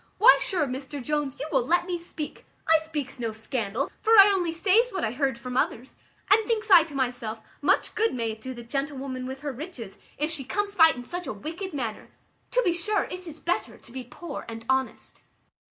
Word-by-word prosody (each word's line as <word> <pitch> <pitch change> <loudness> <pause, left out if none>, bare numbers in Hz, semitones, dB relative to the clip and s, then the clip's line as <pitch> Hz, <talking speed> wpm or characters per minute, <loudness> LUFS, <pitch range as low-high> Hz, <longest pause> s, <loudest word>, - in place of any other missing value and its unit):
why 470 +4 +9
sure, 350 -6 0
Mr 270 +2 -5
Jones, 290 0 -2
you 285 - -3
will 265 -4 +3
let 345 +7 +2
me 355 -1 -2
speak; 330 -3 -7 0.2
I 320 0 +6
speaks 300 -4 -5
no 230 -2 -2
scandal, 220 +2 -3
for 445 - +3
I 400 0 +10
only 350 -4 0
says 390 +8 +3
what 380 - -3
I 220 - 0
heard 265 -1 0
from 250 +1 -6
others 255 0 -1 0.4
and 440 +2 +6
thinks 440 -2 -1
I 355 -3 +10
to 305 -4 -10
myself, 245 -4 -2 0.2
much - - +2
good 450 +1 +2
may 230 -2 -1
it 220 0 -9
do 260 +1 -6
the 240 - -8
gentlewoman 270 0 -3
with 265 +1 -6
her 290 -1 -3
riches, 255 - -8 0.2
if 305 +2 0
she 305 -4 -3
comes 405 +10 -2
by 325 -4 +7
it - - -1
in 245 0 -8
such 355 +5 -5
a - - -2
wicked 330 - -6
manner. 240 -8 -4 0.4
To - - +2
be 350 - +3
sure 390 +4 0
it 365 0 -7
is 315 -1 -8
better 345 - -2
to - - -13
be 260 +1 -6
poor 285 +5 -7
and 225 0 -7
honest." 265 0 -1
290 Hz, 220 wpm, -26 LUFS, 250-350 Hz, 0.4 s, I